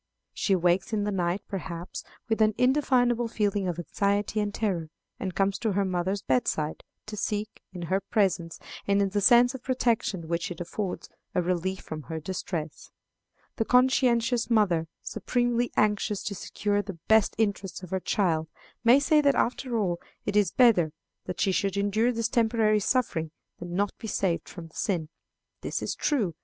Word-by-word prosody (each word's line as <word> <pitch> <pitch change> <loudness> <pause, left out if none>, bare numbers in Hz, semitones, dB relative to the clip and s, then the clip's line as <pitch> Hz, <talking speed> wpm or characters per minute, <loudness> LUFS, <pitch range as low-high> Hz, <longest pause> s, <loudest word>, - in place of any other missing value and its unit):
She 195 - +1
wakes 180 +3 +1
in 210 -1 +1
the 205 - -1
night, 180 0 -1
perhaps, 175 -3 -6 0.2
with 225 -1 0
an 215 -1 +4
indefinable 250 -3 +3
feeling 205 -3 0
of 175 -2 -2
anxiety 200 +4 0
and 205 -1 0
terror, 190 -7 -2 0.3
and 185 -3 -4
comes 195 0 +1
to 220 -4 0
her 200 +1 +1
mother's 185 +2 -1
bedside, 150 +4 0 0.2
to 215 - -6
seek, 210 +1 -3
in 180 -2 -7
her 190 +4 0
presence, 185 -5 0 0.3
and 200 0 +3
in 200 -1 +2
the 205 +1 0
sense 245 +4 +6
of 265 - -7
protection 230 -9 0
which 170 +1 -1
it 175 - -7
affords, 180 +2 -4 0.3
a 180 - +3
relief 185 +2 -1
from 155 -1 -6
her 160 +2 -5
distress. 165 -2 -5 0.7
The 225 - +1
conscientious 245 -2 +3
mother, 185 -8 +2 0.2
supremely 245 -1 0
anxious 210 -1 +1
to 205 - -3
secure 205 +1 -1
the 195 -3 -8
best 220 -2 +4
interests 200 -4 -1
of 180 - -9
her 190 - 0
child, 165 -5 0 0.4
may 245 +3 +7
say 300 +1 +4
that, 280 -1 +3
after 245 0 0
all, 180 -5 -1 0.2
it 205 - -2
is 205 -4 +4
better 180 -10 +4 0.3
that 180 - -5
she 195 - +2
should 195 +1 0
endure 210 +4 +2
this 230 -2 -1
temporary 220 -2 +2
suffering 200 -8 0 0.3
than 175 0 -6
not 200 +1 0
be 225 - -6
saved 185 -5 -1
from 170 -3 -9
the - - -24
sin. 165 -6 -1 0.5
This - - -3
is - - -1
true. 225 - 0
200 Hz, 175 wpm, -27 LUFS, 180-225 Hz, 0.7 s, may